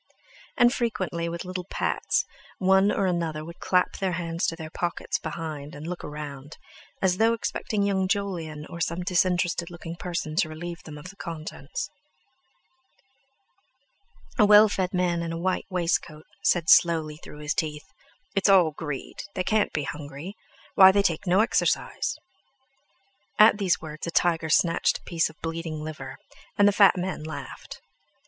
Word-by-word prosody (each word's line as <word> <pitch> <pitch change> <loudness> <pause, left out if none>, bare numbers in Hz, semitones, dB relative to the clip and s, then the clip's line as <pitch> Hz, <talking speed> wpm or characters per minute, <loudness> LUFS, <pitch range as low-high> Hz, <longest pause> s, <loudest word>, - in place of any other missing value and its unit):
And 240 0 +5
frequently, 185 -8 -2
with 170 +2 -5
little 180 0 -5
pats, - - 0 0.3
one 190 +2 +4
or 195 - 0
another 165 -4 -1
would 170 +1 -10
clap 180 -1 +1
their 190 -2 0
hands 170 0 -2
to 165 - -1
their 160 -2 -8
pockets 175 -1 -2
behind 155 -2 -6
and 145 +2 -8
look 175 +1 -5
round, 145 -1 -7 0.5
as 180 -1 +3
though 225 +2 +4
expecting 215 -2 -2
young 190 -2 +1
Jolyon 175 -7 -2
or 170 - -8
some 170 +2 -1
disinterested 175 -2 +1
looking 170 -1 -8
person 170 -3 -4
to 165 -4 +2
relieve 170 +2 -7
them 150 -2 -9
of 180 +5 -9
the - - -21
contents. 155 -4 -6 2.5
A 210 - +7
well 210 +1 +8
fed 190 -3 -1
man 180 -2 0
in 165 -1 -3
a 165 - -3
white 185 +2 -1
waistcoat 170 -4 -1 0.2
said 175 -4 +2
slowly 160 -3 +4
through 150 - -12
his 150 0 -1
teeth: 150 -2 -3 0.5
"It's 195 0 +3
all 180 -5 +6
greed; 150 -2 -6
they 185 - 0
can't 215 +1 +1
be 150 - -2
hungry. 145 +5 -7 0.4
Why, 190 -1 +9
they 200 +1 +2
take 180 +1 0
no 185 +4 +5
exercise." 230 - 0 1.2
At 215 0 +7
these 190 -4 +2
words 155 0 -7
a - - -1
tiger 165 -1 +1
snatched 165 +1 +3
a - - -25
piece 165 -2 0
of 160 - -17
bleeding 165 -1 -4
liver, 145 -4 -7 0.4
and 205 - +6
the - - +6
fat 200 -1 +5
man 180 -2 -3
laughed. 155 0 -8
170 Hz, 160 wpm, -26 LUFS, 155-190 Hz, 2.5 s, Why